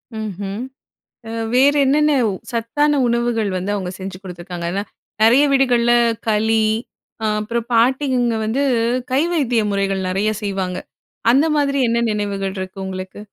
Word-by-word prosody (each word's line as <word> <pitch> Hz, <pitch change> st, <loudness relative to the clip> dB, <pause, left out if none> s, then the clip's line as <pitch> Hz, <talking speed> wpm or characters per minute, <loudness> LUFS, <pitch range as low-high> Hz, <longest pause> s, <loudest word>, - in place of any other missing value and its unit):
ம்ஹ்ம். 205 Hz, -2 st, -5 dB, 0.7 s
அ -, -, -7 dB, 0.2 s
வேற 275 Hz, +3 st, +5 dB
என்னென்ன 300 Hz, +2 st, +3 dB, 0.4 s
சத்தான 285 Hz, +5 st, +1 dB
உணவுகள் 235 Hz, -3 st, 0 dB
வந்து 185 Hz, +3 st, -3 dB
அவங்க 185 Hz, -3 st, -4 dB
செஞ்சு 190 Hz, -1 st, -6 dB
குடுத்திருக்காங்க? 175 Hz, -2 st, -7 dB, 0.6 s
நறைய 245 Hz, +6 st, +6 dB
வீடுகள்ல 245 Hz, -3 st, +3 dB, 0.4 s
களி 220 Hz, +1 st, +2 dB, 0.6 s
ஆ -, -, +1 dB, 0.2 s
அப்புறம் 235 Hz, +2 st, -3 dB
பாட்டிங்க 245 Hz, 0 st, +2 dB
வந்து 235 Hz, +6 st, 0 dB, 0.5 s
கை 265 Hz, -, +3 dB
வைத்திய 250 Hz, -8 st, +1 dB
முறைகள் 195 Hz, -1 st, -1 dB
நறைய 195 Hz, +4 st, 0 dB
செய்வாங்க. 190 Hz, -2 st, -2 dB, 0.5 s
அந்த 275 Hz, +5 st, +4 dB
மாதிரி 280 Hz, -1 st, +1 dB
என்ன 235 Hz, 0 st, +1 dB
நினைவுகள் 200 Hz, -2 st, -2 dB
இருக்கு 190 Hz, 0 st, -6 dB
உங்களுக்கு? 185 Hz, +1 st, -6 dB
220 Hz, 125 wpm, -19 LUFS, 195-250 Hz, 0.7 s, நறைய